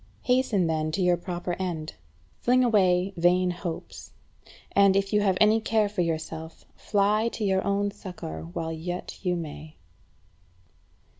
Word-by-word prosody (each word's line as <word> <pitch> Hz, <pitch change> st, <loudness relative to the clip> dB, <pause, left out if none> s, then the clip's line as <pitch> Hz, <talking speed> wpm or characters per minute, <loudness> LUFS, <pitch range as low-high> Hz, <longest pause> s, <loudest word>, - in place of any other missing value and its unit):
Hasten 250 Hz, -7 st, +2 dB
then 155 Hz, -1 st, -1 dB
to 190 Hz, -, 0 dB
your 180 Hz, -1 st, +4 dB
proper 175 Hz, 0 st, -4 dB
end. 170 Hz, -4 st, -3 dB, 0.5 s
Fling 255 Hz, +1 st, +3 dB
away 190 Hz, -5 st, +3 dB
vain 180 Hz, +1 st, +3 dB
hopes, 175 Hz, -1 st, -7 dB, 0.6 s
and, 200 Hz, -1 st, +5 dB
if 195 Hz, +1 st, 0 dB
you 210 Hz, -, +4 dB
have 190 Hz, -3 st, +2 dB
any 215 Hz, +1 st, +5 dB
care 220 Hz, -1 st, +2 dB
for 205 Hz, -2 st, -2 dB
yourself, 160 Hz, -1 st, -4 dB
fly 210 Hz, +2 st, +1 dB
to 220 Hz, -, -4 dB
your 190 Hz, -1 st, +1 dB
own 200 Hz, 0 st, 0 dB
succour 175 Hz, -, -7 dB
while 160 Hz, -, -4 dB
yet 175 Hz, +3 st, -5 dB
you 180 Hz, -2 st, +1 dB
may. 155 Hz, -1 st, -7 dB
185 Hz, 145 wpm, -26 LUFS, 165-205 Hz, 0.6 s, and